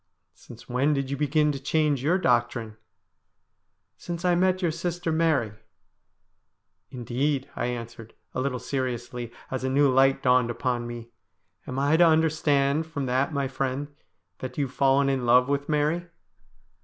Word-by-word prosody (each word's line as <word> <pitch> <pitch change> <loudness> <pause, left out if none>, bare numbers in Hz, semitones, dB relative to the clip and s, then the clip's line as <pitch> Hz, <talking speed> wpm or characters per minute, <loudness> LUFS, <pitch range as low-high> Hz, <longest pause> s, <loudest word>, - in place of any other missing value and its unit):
' - - -51
Since 120 0 -14
when 135 +4 +1
did 135 -1 -2
you - - 0
begin 150 +1 +2
to 140 - -5
change 145 -1 +1
your 170 +6 +3
doctrine? 120 - 0 0.4
' - - -51
' - - -51 0.3
Since 175 0 -6
I 180 - +4
met 185 +1 +1
your 170 - +2
sister 170 +1 -3
Mary.' 155 -9 +1 0.7
' - - -49 0.5
Indeed,' 130 +3 -2
I - - -2
answered, 115 -2 -7 0.2
a 130 - -2
little 130 -1 -1
seriously, 125 -2 -4 0.2
as 130 -1 -3
a 130 - 0
new 140 +1 +3
light 135 +1 +3
dawned 125 -1 +3
upon 120 0 -2
me, 120 0 -8 0.3
' - - -41
am 130 - -5
I 145 +3 +3
to 175 - +6
understand 155 -2 +2
from 145 -4 -4
that, 130 +3 0
my 140 -2 -1
friend, 135 +2 -3 0.5
that 130 - -7
you 145 - +1
have 130 - -10
fallen 135 0 +3
in 130 -3 0
love 125 +1 +5
with 140 +1 -2
Mary 155 +3 0
135 Hz, 175 wpm, -26 LUFS, 125-150 Hz, 0.7 s, to